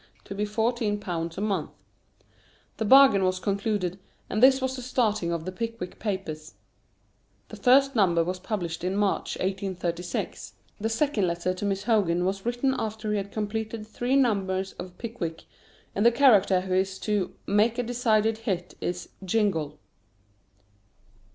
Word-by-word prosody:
to - - -7
be 205 +1 -1
fourteen 220 0 0
pounds 165 -4 -4
a - - -3
month. 205 -2 -1 1.1
The 220 - -1
bargain 265 -4 +7
was 185 0 +1
concluded, 200 -2 -1 0.3
and 215 - 0
this 265 +1 +7
was 260 0 -2
the 255 - -6
starting 215 -8 0
of 165 -1 -3
"The 185 - -3
Pickwick 230 -2 -5
Papers." 175 -7 -4 0.9
The - - -8
first 270 +2 +4
number 175 -6 +3
was 180 +2 -3
published 175 -5 -4
in 185 +2 -1
March, 205 -1 0
1836. 180 -2 -3 0.2
The 220 +2 -1
second 225 -4 +1
letter 170 +2 -1
to 185 +2 -5
Miss 195 0 -1
Hogarth 205 -7 +2
was 195 +4 -2
written 245 +3 +1
after 215 0 -3
he 210 - +1
had 200 0 -4
completed 220 +1 -3
three 245 +4 -1
numbers 195 -7 +1
of 180 0 -8
"Pickwick," 185 -9 -5 0.5
and 205 - 0
the 235 - +7
character 210 -8 +5
who 185 0 -3
is 190 +1 +1
to 205 -4 -1
"make 215 +3 +2
a 245 - 0
decided 225 -2 +1
hit" 185 -6 -3
is 180 0 -3 0.2
"Jingle." 180 -7 0
205 Hz, 155 wpm, -26 LUFS, 185-225 Hz, 1.1 s, bargain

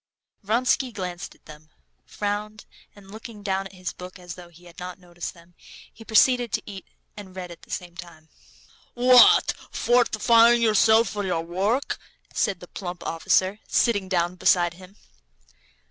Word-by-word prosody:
Vronsky 245 +4 +1
glanced 185 -3 -6
at - - -30
them, 155 0 -14 0.4
frowned, 210 +1 -4 0.3
and 200 -1 -16
looking 220 -1 -10
down 195 -1 -1
at 195 - -19
his 185 -1 -6
book 180 +1 -10
as 175 -2 -9
though 175 -1 -12
he 175 +1 -19
had 175 0 -14
not 180 0 -7
noticed 175 -1 -8
them, 170 +1 -19 0.4
he 225 - -13
proceeded 240 +1 +3
to 220 - -1
eat 195 -2 -10 0.3
and 190 -3 -11
read 180 -2 -7
at 170 - -12
the - - -19
same 175 -1 -6
time. 170 -3 -12 0.7
"What? 255 - +6 0.2
Fortifying 235 0 +4
yourself 220 0 +4
for 205 +1 -4
your 180 -4 -1
work?" 195 +10 -1 0.3
said 190 -3 -1
the 180 - -10
plump 175 -2 -7
officer, 185 +4 0
sitting 205 -6 +1
down 175 -1 0
beside 175 -1 +3
him. 185 +3 -15
190 Hz, 160 wpm, -24 LUFS, 175-220 Hz, 0.7 s, What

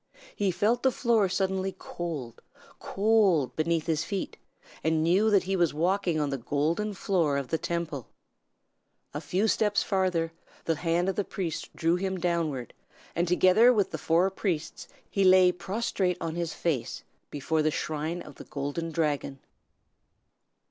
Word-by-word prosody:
He 200 -2 +1
felt 220 +6 +1
the 265 - +3
floor 230 -6 +2
suddenly 190 0 -1
cold, 145 -9 -6 0.4
cold, 200 - +2
beneath 160 0 0
his 160 -2 0
feet, 195 +2 -4 0.5
and 160 0 +2
knew 190 +7 +3
that 200 -3 +4
he 190 +1 -1
was 170 -5 +1
walking 175 0 +1
on 145 -2 -1
the 135 - -2
golden 165 - -1
floor 170 -7 +1
of 140 -2 -4
the 160 - 0
Temple. 165 -7 -3 1.1
A 145 - -4
few 190 +6 0
steps 210 -1 +2
farther, 180 -5 0 0.3
the 165 -2 0
hand 170 +2 0
of 195 - -1
the 205 - +1
priest 175 -5 -5
drew 165 +2 +1
him 190 0 -2
downward, 165 -8 -1 0.4
and 175 +2 +1
together 185 +7 +5
with 205 -5 +1
the - - -4
four 175 +4 +2
priests 180 -5 -3 0.2
he 195 - 0
lay 185 -1 +6
prostrate 190 -1 -2
on 165 -1 -3
his 170 -1 -2
face 155 -8 -2 0.3
before 155 +2 -1
the 155 - +2
shrine 155 +3 -3
of - - -12
the - - -10
Golden 145 +4 -4
Dragon. 150 -4 -1
175 Hz, 155 wpm, -28 LUFS, 155-190 Hz, 1.1 s, lay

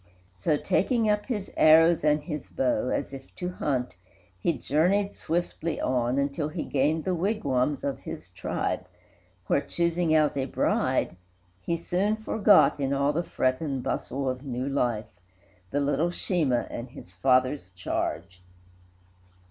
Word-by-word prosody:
So, 150 - +1
taking 215 - +1
up 210 0 -1
his 210 -7 -3
arrows 165 +1 +6
and 150 0 +2
his 150 -3 -5
bow, 125 -2 0
As - - -2
if 135 0 -11
to 180 - -3
hunt, 135 - -2 0.4
he 170 - +2
journeyed 175 +8 +1
swiftly 170 -1 -2
on, 125 0 0
Until 140 +2 0
he 160 0 -4
gained 150 +3 +1
the 185 - +1
wigwams 150 - 0
of 140 -1 -2
his - - -8
tribe, - - -3 0.6
Where, - - +2
choosing 170 -1 0
out 150 -2 +3
a 135 -1 0
bride, 90 -7 0 0.4
he 170 - -1
soon 185 +5 0
forgot, 215 -6 +4
In 135 0 0
all 140 +1 +1
the 165 - +1
fret 130 -5 0
and 135 -5 -2
bustle 135 +1 -2
of 130 0 -2
new 130 -1 -3
life, 120 -6 0 0.6
The 145 +8 0
little 145 +4 +1
Sheemah 160 -9 0
and 120 +2 -6
his 90 -7 -12
father's 130 +2 +1
charge. 90 0 -3
145 Hz, 150 wpm, -27 LUFS, 130-170 Hz, 0.6 s, arrows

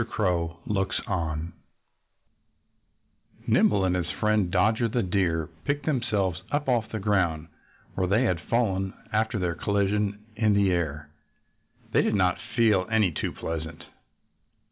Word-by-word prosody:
CROW 85 -6 0
LOOKS 95 -2 -1
ON 85 -5 -2 1.9
Nimble 100 -2 +3
and 90 -1 +1
his 85 -2 -2
friend 105 -4 +1
Dodger 110 +6 +2
the 120 +2 0
Deer 90 -4 0 0.2
picked 145 +1 -1
themselves 105 - 0
up 145 -1 -1
off 115 -4 +1
the 110 - -4
ground 90 -6 0 0.4
where 95 -1 0
they 105 +7 +3
had 90 -8 0
fallen 95 -2 0 0.2
after 110 +1 +1
their 90 -3 0
collision 100 +2 0 0.2
in 110 -1 +2
the 100 -2 +3
air. 75 -4 -2 0.8
They - - +4
did - - +1
not 90 -3 +2 0.2
feel 110 -6 +3
any 110 -5 +3
too - - -3
pleasant. 80 -1 -5
95 Hz, 135 wpm, -26 LUFS, 85-110 Hz, 1.9 s, They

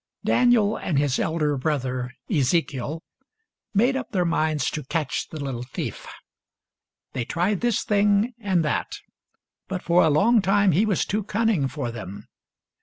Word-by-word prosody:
Daniel 235 -4 +3
and 155 - -2
his 140 -2 +1
elder 155 -3 0
brother 130 -3 -2 0.2
Ezekiel 150 - 0 0.7
made 240 +6 +2
up 265 - -3
their 180 -4 0
minds 155 -4 0
to 155 - -4
catch 150 -1 -2
the 155 - -7
little 135 -4 -4
thief. 125 +1 -6 1.1
They 125 - -2
tried 175 - -1
this 240 -2 +1
thing 205 +3 +2
and 190 -6 +1
that, 150 - -1 0.7
but 185 -1 -4
for 175 +1 +4
a 160 - +4
long 215 +10 +4
time 200 0 +3
he 195 +8 +2
was 200 -5 +1
too 210 +2 -1
cunning 215 -8 +1
for 130 -2 -4
them. 105 -2 -8
165 Hz, 150 wpm, -24 LUFS, 140-205 Hz, 1.1 s, for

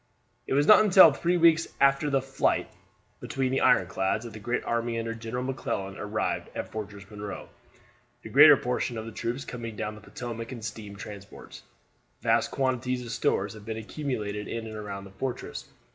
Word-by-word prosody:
It - - 0
was 145 +1 +4
not 215 +3 +8
until 185 -6 +8
three 175 +5 +1
weeks 165 -1 +5
after 140 +2 +4
the 135 -2 +1
fight 135 0 0 0.5
between 130 -1 -2
the 135 - +1
ironclads 95 +3 +2
that 115 - -8
the 110 - -8
great 120 +4 -2
army 115 0 -1
under 115 0 -2
General 115 +2 -4
McClellan 100 -7 -3
arrived 105 +1 -2
off - - -5
Fortress 105 -2 -7
Monroe, 105 -2 -7 0.7
the - - -8
greater - - +9
portion 125 -1 -2
of 110 - -5
the 115 - -7
troops 120 +4 -4
coming 115 -3 -6
down 105 +1 -3
the 105 - -12
Potomac 115 +1 -7
in 120 -4 -7
steam 105 -2 -7
transports. 100 0 -10 0.6
Vast - - +2
quantities 130 -1 -1
of 115 - -6
stores 100 -3 0
had 110 -1 -12
been 110 +1 -5
accumulated 110 -4 -4
in 115 -1 -4
and 110 -1 -7
around 100 -2 -6
the 100 - -12
fortress. 125 +6 -5
115 Hz, 180 wpm, -27 LUFS, 105-130 Hz, 0.7 s, greater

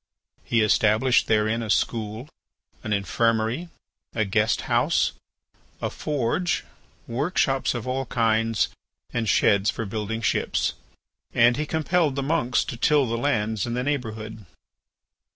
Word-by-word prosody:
He 115 - +1
established 110 +4 +3
therein 110 +1 +2
a 110 - -5
school, 110 +3 -1 0.6
an 110 - -4
infirmary, 115 - 0 0.5
a 110 -2 +1
guest 105 +3 +1
house, - - +2 0.7
a - - -3
forge, 150 +5 -1 0.4
work 140 +10 -3
shops 135 -2 +2
of 120 0 -4
all 130 0 -2
kinds, 115 -2 +1 0.4
and 115 -2 -1
sheds 100 +1 +3
for 115 - -3
building 110 +2 -4
ships, 105 - 0 0.6
and 120 +1 +5
he 150 +1 -2
compelled 160 -1 +1
the 140 - -1
monks 140 -4 +1
to 120 - -6
till 145 +2 +3
the 115 -1 -2
lands 110 -5 0
in 120 - -2
the 125 - -1
neighbourhood. 110 - -4
115 Hz, 135 wpm, -24 LUFS, 110-135 Hz, 0.7 s, and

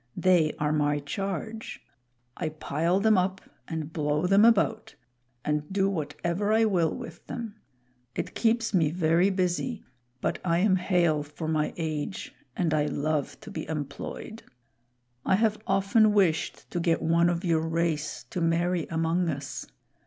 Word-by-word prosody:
They 175 -4 +4
are 150 0 0
my 150 -1 +2
charge. 195 +8 -4 0.6
I 160 - -2
pile 160 +4 0
them 215 -1 +4
up 190 +1 -1 0.3
and 160 -2 -5
blow 150 +1 0
them 195 +4 +5
about 225 -1 +2 0.5
and 150 +1 -1
do 195 0 +2
whatever 170 +5 -2
I 225 +1 +4
will 175 -6 +2
with 165 +1 -10
them. 230 -3 -6 0.6
It - - -3
keeps 230 0 +1
me 165 -5 +3
very 170 +3 +3
busy, 190 +5 -1 0.4
but - - -1
I 170 -2 +2
am 190 +1 +3
hale 175 -4 +2
for 150 +2 -6
my 155 -1 0
age, 160 +2 -4 0.2
and 170 -4 +1
I 150 -1 +2
love 150 0 -2
to - - -10
be - - -5
employed. 155 +8 -5 0.8
I - - +3
have 215 +1 +1
often 200 +3 +4
wished 185 -6 +1
to 175 - -1
get 165 -1 +1
one 170 +1 +3
of 175 +1 -2
your 165 -2 +2
race 160 -2 -1
to 180 - -2
marry 170 +1 +1
among 165 +2 0
us. 140 -3 -5
170 Hz, 150 wpm, -27 LUFS, 155-195 Hz, 0.8 s, them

